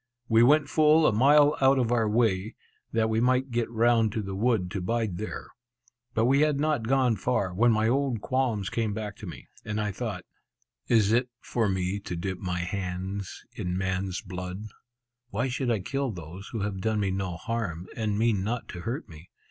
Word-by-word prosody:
We 115 0 +5
went 145 +4 +5
full 155 +1 +4
a - - +5
mile 145 +6 +5
out 135 +1 +5
of 120 -3 +1
our 115 -3 +2
way, 110 -2 +1 0.4
that 115 -1 +2
we 110 0 +1
might 130 +1 +2
get 120 -1 0
round 115 -1 +3
to 110 - -2
the 95 0 -5
wood 100 -3 +1
to 100 -3 -3
bide 105 -2 -1
there. 110 - -6 0.7
But 115 - +3
we 135 +3 +4
had 150 -2 +2
not 145 -7 0
gone 130 -3 +3
far, 100 -7 0
when 115 +6 +4
my 110 0 +2
old 130 -1 +1
qualms 115 -5 -1
came 110 -3 -1
back 105 -2 -5
to 105 - -9
me, 85 - -9 0.2
and 105 0 -3
I 105 -1 -1
thought, 100 -3 -5 0.6
"Is 110 -3 +4
it 125 +2 +2
for 115 -4 -1
me 95 +1 -1
to 90 - -5
dip 90 +2 -4
my 90 -1 -2
hands 95 +1 -4
in 90 0 -3
man's 95 0 -2
blood? 90 +1 -6 0.6
Why 115 +4 -1
should 125 0 -2
I 110 -4 +1
kill 135 +7 -2
those 90 0 -8
who 115 - -4
have 100 -2 -3
done 110 +1 0
me 100 -2 0
no 95 -2 -2
harm, 90 -4 -3
and 105 -3 -1
mean 110 -3 +2
not 115 +3 -3
to 90 - -7
hurt 125 - -4
me? 80 +2 -13
110 Hz, 200 wpm, -27 LUFS, 95-120 Hz, 0.7 s, We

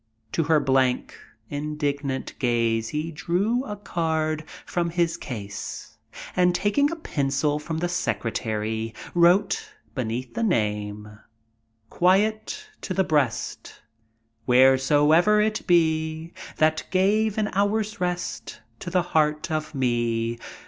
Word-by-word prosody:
To 165 - 0
her 160 0 +4
blank, 130 -2 +1 0.4
indignant 145 -2 -2
gaze 115 -3 +1
he 155 +5 -3
drew 200 - 0
a 210 - -5
card 160 -5 -1 0.2
from 170 -1 -1
his 170 -1 +1
case, 100 -6 -7 0.4
and, 180 -1 +3
taking 210 +10 +2
a 335 - -3
pencil 145 - -1
from 160 +1 -4
the 175 +2 0
secretary, 110 -8 -2 0.2
wrote, 195 - +3 0.2
beneath 125 0 -3
the 235 - -3
name: 105 - -1 0.7
Quiet 215 - +1
to 185 - -4
the 190 - +3
breast 145 -9 -1 0.7
Wheresoe'er 145 +9 +5
it 215 0 0
be, 160 -1 +1 0.2
That 155 0 +2
gave 205 +3 +2
an 210 -1 +1
hour's 205 0 0
rest 180 0 -3 0.2
To - - -6
the 180 0 +2
heart 155 -2 +1
of 155 -1 -3
me. 120 -2 0
155 Hz, 115 wpm, -25 LUFS, 130-185 Hz, 0.7 s, Wheresoe'er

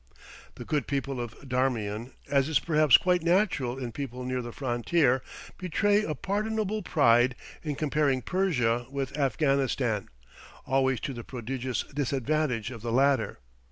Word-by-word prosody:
The - - -8
good 150 -2 -1
people 140 -2 -2
of 120 -2 -7
Darmian, 125 -3 -1
as 140 0 +2
is 160 - +3
perhaps 155 -1 +5
quite 180 -1 +1
natural 170 - +1
in 125 -3 -4
people 125 0 -5
near 130 0 -2
the 120 0 -6
frontier, 130 +2 +1 0.4
betray 205 +3 +2
a 155 -6 -2
pardonable 215 +4 -1
pride 120 - +4 0.3
in 150 -3 -3
comparing 145 -3 +1
Persia 125 -11 +1
with 135 0 -4
Afghanistan, 135 -5 +1 0.6
always 130 -2 +2
to 140 -3 -3
the 120 -1 -7
prodigious 130 +1 -3
disadvantage 135 -3 -1
of 115 -4 -8
the 115 0 -3
latter. 135 - +2
135 Hz, 140 wpm, -28 LUFS, 120-155 Hz, 0.6 s, perhaps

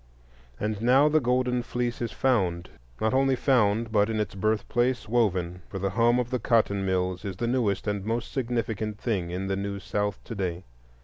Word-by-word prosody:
And 105 0 -2
now 130 +5 +5
the 155 +1 +4
golden 125 -1 +1
fleece 120 0 -3
is 120 - -2
found; 90 -9 0 0.3
not 110 +2 +1
only 135 0 +3
found, 115 -4 +2
but, 105 -1 +3
in 110 -1 -1
its 105 - -2
birthplace, 110 +5 0
woven. 90 -6 0
For 95 - -5
the 100 0 -1
hum 120 +3 +3
of 125 0 -1
the 125 - 0
cotton 105 -5 +2
mills 95 -1 -1
is 95 -3 -5
the 120 - -1
newest 115 -5 0
and 100 -2 -2
most 115 +3 -2
significant 115 -4 -2
thing 100 -7 -2
in 90 +2 -3
the 95 0 -1
New 100 0 -3
South 105 0 -2
to - - -7
day. 95 -3 -3
110 Hz, 190 wpm, -27 LUFS, 100-120 Hz, 0.3 s, now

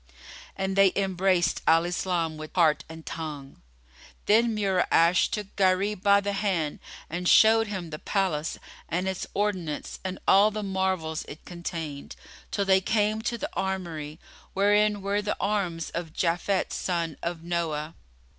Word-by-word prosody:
And 190 0 -2
they 195 -1 +6
embraced 185 -3 +1
Al 165 +1 +5
Islam 175 -2 -1
with 155 +2 -9
heart 155 -4 +3
and 160 0 -10
tongue. 150 -4 -7 0.6
Then 225 +1 +3
Mura'ash 180 -3 +3
took 210 -2 -5
Gharib 190 +1 +2
by 200 0 +5
the 200 0 -2
hand 185 -7 -1 0.3
and 175 +2 -2
showed 225 0 +6
him 185 -5 -5
the 155 - -6
palace 180 -6 -1 0.3
and 180 +3 -1
its 190 -1 -3
ordinance 185 -7 -2
and 185 0 -4
all 200 +2 +6
the 215 0 -4
marvels 190 -5 -1
it 150 - -11
contained, 165 -5 -6 0.3
till 200 - -1
they 190 -1 +4
came 215 +2 +1
to 235 +1 -2
the - - -4
armoury, 170 -5 -4 0.4
wherein 205 +1 +3
were 200 +1 0
the 210 0 -2
arms 185 -6 -1
of 170 -2 -5
Japhet 175 +3 0
son 170 -4 -2
of 170 -1 -4
Noah. 165 -3 -2
185 Hz, 145 wpm, -27 LUFS, 165-200 Hz, 0.6 s, they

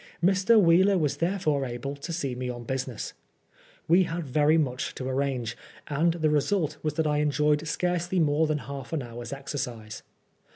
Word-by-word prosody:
Mr. 190 +5 +5
Wheeler 190 +2 +5
was 150 -4 0
therefore 165 -4 0
able 130 +2 -4
to 145 +5 -7
see 145 -6 -2
me 125 0 -4
on 120 -1 -6
business. 130 -2 -4 0.7
We 180 +3 +5
had 165 -6 -5 0.2
much 130 -4 -2
to 130 - -5
arrange, 130 -3 -1 0.3
and 160 +4 +2
the 155 -3 +1
result 150 0 +1
was 155 -1 -2
that 160 0 +1
I 150 -1 +1
enjoyed 150 +1 +1
scarcely 180 +3 0
more 155 0 +3
than 155 -1 0
half 140 -1 -7
an 150 -4 -1
hour's 120 0 -8
exercise. 125 -6 -5
150 Hz, 165 wpm, -27 LUFS, 130-165 Hz, 0.7 s, Mr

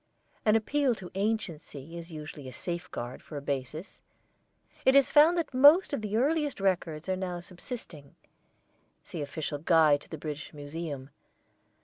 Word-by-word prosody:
An 215 0 +5
appeal 260 +3 +2
to 185 -4 -10
anciency 170 -8 -3
is 170 0 -8
usually 150 -3 -8
a - - -7
safeguard 170 -7 -4
for 150 - -8
a - - -4
basis. 140 - -4 0.8
It 265 - +5
is 275 -1 +5
found 315 +4 +6
that 325 -5 -2
most 290 +7 +7
of 280 - -1
the 210 0 -1
earliest 290 +1 +1
records 175 -4 0
are 190 - +1
now 180 -2 -3
subsisting. 175 - -9 0.9
See - - -6
official 145 0 -4
guide 155 -2 +4
to - - -16
the 160 - -6
British 150 +1 -6
Museum. 145 -2 -6
170 Hz, 150 wpm, -29 LUFS, 150-225 Hz, 0.9 s, most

